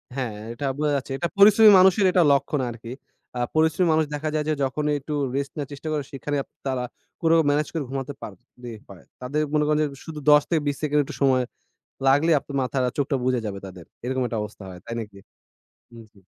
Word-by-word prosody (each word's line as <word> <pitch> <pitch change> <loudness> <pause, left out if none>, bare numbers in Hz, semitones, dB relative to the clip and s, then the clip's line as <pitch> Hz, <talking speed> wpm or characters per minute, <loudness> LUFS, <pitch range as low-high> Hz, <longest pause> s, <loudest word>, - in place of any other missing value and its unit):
হ্যাঁ, 125 -6 -3 0.2
এটা 140 - -5
বোঝা 150 0 0
যাচ্ছে। 135 0 -4
এটা 170 - -1
পরিশ্রমী 210 +1 +8
মানুষের 190 +1 +5
এটা 180 -1 +4
লক্ষণ 140 +1 +1
আরকি। 115 0 -9 0.5
আ - - -2 0.2
পরিশ্রমী 160 +3 +3
মানুষ 155 0 +2
দেখা 155 +1 -3
যায় 150 - 0
যে, - - +2
যখনই 150 +3 -1
একটু 150 +3 -6 0.2
রেস্ট 140 0 -2
নেয়ার 145 -2 -4
চেষ্টা 145 +3 -8
করে, 150 -2 -1
সেখানেই 140 +2 -3
আপ - - -33 0.2
তারা 130 -2 -1 0.4
কোরো 165 0 +4
ম্যানেজ 150 +1 +1
করে 160 -3 -2
ঘুমাতে 135 +1 -4
পারলেই 120 +2 -10
হয়। 95 -4 -14 0.2
তাদের 140 +5 -1
মনে 150 -1 +3
করেন 150 0 +2
যে - - +1 0.2
শুধু 155 -2 -7
১০ 150 0 +7
থেকে 165 -3 +1
২০ 145 - 0
সেকেন্ড 150 -1 +2
একটু - - -8
সময় 130 -2 +3 0.6
লাগলেই 150 +4 +4
আপনার 140 +1 -9
মাথার 130 0 -1
আ - - -12
চোখটা 140 -1 0
বুজে 125 -1 +1
যাবে 100 -1 -5
তাদের। 90 -3 -12 0.2
এরকম 130 +1 -1
একটা 115 - -3
অবস্থা 105 -1 -10
হয়, 90 - -10
তাই 115 - -5
নাকি? 100 -3 -11 0.8
উম 115 - -11
জ্বী। 100 - -22
140 Hz, 215 wpm, -24 LUFS, 125-150 Hz, 0.8 s, পরিশ্রমী